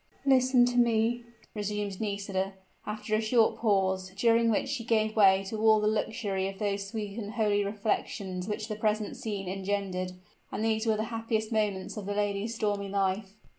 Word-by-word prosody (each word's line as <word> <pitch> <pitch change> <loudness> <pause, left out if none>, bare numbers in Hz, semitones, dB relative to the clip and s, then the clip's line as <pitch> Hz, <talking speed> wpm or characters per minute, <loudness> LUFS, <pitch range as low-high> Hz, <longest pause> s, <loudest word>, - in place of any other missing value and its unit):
"Listen 255 -2 +5
to 245 0 -1
me," 235 0 +2 0.3
resumed 205 -2 -3
Nisida, 200 -2 -2 0.3
after 210 0 -4
a 215 - +3
short 225 0 +3
pause, 190 -3 +1
during 230 0 +4
which 225 +4 +1
she 270 -3 -3
gave 220 -1 +1
way 195 -2 +6
to 215 +2 -4
all 220 -1 +6
the 210 - 0
luxury 210 -3 0
of 195 0 -6
those 200 -1 -2
sweet 210 0 -5
and 210 -1 -5
holy 205 -2 +2
reflections 200 -2 -2
which 210 0 -3
the 215 - -3
present 215 +1 -1
scene 210 -6 -4
engendered: 190 -1 -2 0.4
and 220 - -2
these 220 0 +1
were 220 -1 +3
the 215 - 0
happiest 225 -1 -1
moments 210 -3 -1
of 200 -2 -5
the 205 - -2
lady's 205 +2 -1
stormy 205 -2 -1
life. 195 0 -1
210 Hz, 175 wpm, -29 LUFS, 200-225 Hz, 0.4 s, way